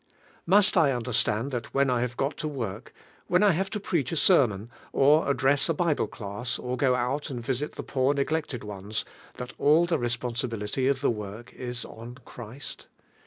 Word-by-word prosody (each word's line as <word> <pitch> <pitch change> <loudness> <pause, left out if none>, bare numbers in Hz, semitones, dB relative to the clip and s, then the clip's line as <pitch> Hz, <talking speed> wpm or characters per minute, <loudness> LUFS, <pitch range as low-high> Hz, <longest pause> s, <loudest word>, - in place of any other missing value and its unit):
Musi 200 +1 +5
I 155 -5 +5
understand 120 0 0
that 120 -1 -5
when 135 -1 +3
I 120 -1 +1
have 120 -1 -3
got 140 +3 -2
in 150 -2 -3
work, 110 -3 -5 0.4
when 180 +3 +3
1 205 - +6
have 190 +3 -1
to 210 - -3
preach 165 - -1
a - - -1
ser 165 -4 +5
mon, 105 +2 -8 0.2
or 145 +2 +4
address 140 +2 +2
a 165 - +2
Bible 165 -2 +1
class, 105 +2 -4
or 125 - -6
to - - -9
go 135 -3 +3
ml1 130 +2 -1
;„„i - - -4
vfeH 135 +4 -2
the - - -5
poor 135 +1 +1
neglected 140 -3 -1
ones, 105 0 -4 0.3
thai 125 0 -6
all 155 +4 +5
the 170 -3 0
responsibility 120 0 -2
of 135 -1 +1
the 140 - +3
work 105 +1 -7
is 125 -1 -5
ou 115 +2 -10
Christ? 120 +4 -9
130 Hz, 195 wpm, -27 LUFS, 120-145 Hz, 0.4 s, 1